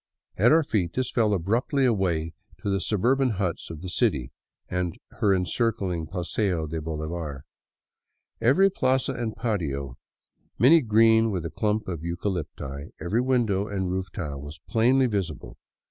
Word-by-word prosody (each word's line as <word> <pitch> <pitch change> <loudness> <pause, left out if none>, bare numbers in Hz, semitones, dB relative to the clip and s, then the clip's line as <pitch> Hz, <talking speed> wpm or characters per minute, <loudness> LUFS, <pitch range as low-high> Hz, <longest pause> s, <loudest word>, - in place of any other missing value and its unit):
At 110 +8 +4
our 160 +1 +5
feet 95 - -1
this 130 0 -1
fell 110 -4 +2
abruptly 115 - +1
away 90 -9 0 0.3
to 100 - 0
the 100 -1 0
suburban 120 +6 +2
huts 90 -4 -2
of 80 -2 -8
the 95 - -6
city 85 - 0 0.4
and 90 -2 -2 0.2
her 100 - +3
encircling 95 -2 0
Paseo 90 -1 -1
de 80 +1 -4
Bolivar. 80 -2 -4 1.0
Every 165 +12 +5
plaza 130 -4 +1
and 115 -4 -3
patio, 75 - -3 0.6
many 155 +7 +6
green 115 -1 +4
with 90 -5 -3
a 85 - -4
clump 105 0 -1
of 85 -4 -3
eucalypti, 85 -5 -4
every 95 +9 0
window 115 -6 +1
and 95 -3 -2
roof 95 0 -2
tile, 75 -7 -5
was 75 +2 -9
plainly 125 +4 +3
visible. 95 - -3
95 Hz, 145 wpm, -26 LUFS, 85-115 Hz, 1.0 s, many